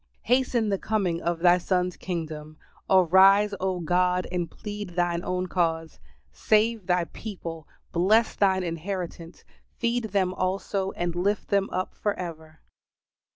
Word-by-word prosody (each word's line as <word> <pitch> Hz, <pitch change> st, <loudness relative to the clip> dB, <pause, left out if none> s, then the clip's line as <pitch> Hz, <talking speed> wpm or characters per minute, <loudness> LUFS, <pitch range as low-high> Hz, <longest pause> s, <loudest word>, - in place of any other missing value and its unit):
Hasten 245 Hz, -2 st, +1 dB
the 195 Hz, -1 st, 0 dB
coming 190 Hz, -6 st, -1 dB
of 170 Hz, -1 st, -2 dB
Thy 180 Hz, 0 st, +5 dB
Son's 180 Hz, 0 st, 0 dB
kingdom. 155 Hz, -4 st, -6 dB, 0.3 s
Arise, 190 Hz, +3 st, +5 dB
O 190 Hz, -1 st, -1 dB
God, 180 Hz, +2 st, +1 dB
and 175 Hz, -2 st, -2 dB
plead 205 Hz, -3 st, -7 dB
Thine 175 Hz, -1 st, 0 dB
own 180 Hz, 0 st, -2 dB
cause. 165 Hz, -3 st, -1 dB, 0.3 s
"Save 215 Hz, -2 st, +1 dB
Thy 180 Hz, -1 st, +2 dB
people, 170 Hz, -4 st, -8 dB, 0.2 s
bless 215 Hz, +7 st, +3 dB
Thine 190 Hz, -2 st, +2 dB
inheritance, 170 Hz, 0 st, -5 dB, 0.3 s
feed 235 Hz, 0 st, 0 dB
them 190 Hz, -3 st, 0 dB
also 190 Hz, +1 st, -2 dB
and 175 Hz, -1 st, -2 dB
lift 195 Hz, +4 st, -1 dB
them 200 Hz, -1 st, +1 dB
up 185 Hz, 0 st, -3 dB
for 205 Hz, -1 st, -2 dB
ever." 160 Hz, -3 st, -8 dB
185 Hz, 135 wpm, -26 LUFS, 170-200 Hz, 0.3 s, Thy